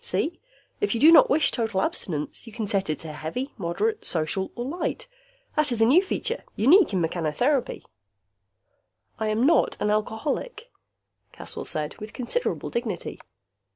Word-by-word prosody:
See? 335 - -1 0.4
If 410 - 0
you - - -1
do 310 +6 +8
not 335 - +8
wish 285 +1 +4
total 225 -5 -1
abstinence, 150 +6 -3
you 225 - -10
can 225 -1 -3
set 195 -3 -1
it 155 - 0
to 155 - -6
heavy, 205 - -5
moderate, 220 - -1
social 170 +4 -1
or 240 - -4
light. 345 - -3 0.5
That 305 -3 +2
is 235 - -1
a 225 - +5
new 290 +10 +6
feature, 465 +5 -3
unique 325 - +5
in 190 - 0
mechanotherapy." 175 - 0 1.4
"I 220 - -1
am 215 +4 +1
not 330 - +3
an 210 - +1
alcoholic," 295 - -2 0.6
Caswell - - -4
said, 150 -1 -3
with 215 0 -8
considerable 370 - -2
dignity. 225 -7 -4
230 Hz, 155 wpm, -25 LUFS, 190-305 Hz, 1.4 s, do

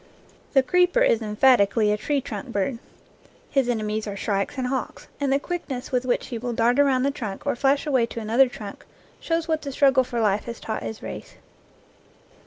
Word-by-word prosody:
The 270 -2 +5
creeper 360 - +3
is 230 - +3
emphatically 215 -1 +3
a - - +2
tree 280 +6 -1
trunk 270 - -6
bird. 230 +4 -1 0.7
His 270 -3 +2
ene 225 -3 0
mies 215 +1 -2
are 200 -1 -5
shrikes 200 +6 -2
and 260 - -1
hawks, 260 +1 -4
and 280 -2 0
the 275 - +4
quickness 285 -6 -5
with 250 -1 0
which 250 - -1
he 235 -3 -4
will 240 +1 -3
dart 235 +3 +2
around 270 -3 +3
the 280 - +2
trunk 215 -8 -6
or - - 0
flash 275 +4 +2
away 260 -6 +2
to 230 - -6
another 230 +4 +3
trunk 205 -4 -9 0.4
shows 330 0 -1
what 315 -1 0
the 280 - -5
struggle 270 -1 +4
for 240 -1 -4
life 210 -2 +1
has 235 -1 -6
taught 220 - -4
his 220 - -6
race. - - -8
250 Hz, 200 wpm, -24 LUFS, 220-275 Hz, 0.7 s, The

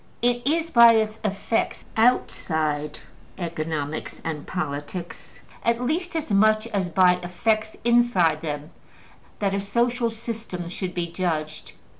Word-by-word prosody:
'' - - -33
It 245 +1 +1
is 330 +2 +1
by 235 -3 +8
its 220 -1 0
effects 210 +2 -1
outside 155 -10 +1 0.4
economics 155 -3 -4
and 155 -3 -4
politics, 170 0 -5 0.2
at 235 0 +2
least 330 +8 -2
as 310 -7 -2
much 215 +2 +4
as 190 -3 -2
by 180 +1 +4
effects 215 +5 -1
inside 235 -10 +3
them, 150 -1 -5 0.7
that 200 -2 0
a 200 - 0
social 235 +4 +1
system 225 -6 -6
should 180 0 -4
be 175 -1 0
judged. 155 -4 -3
195 Hz, 130 wpm, -24 LUFS, 165-235 Hz, 0.7 s, by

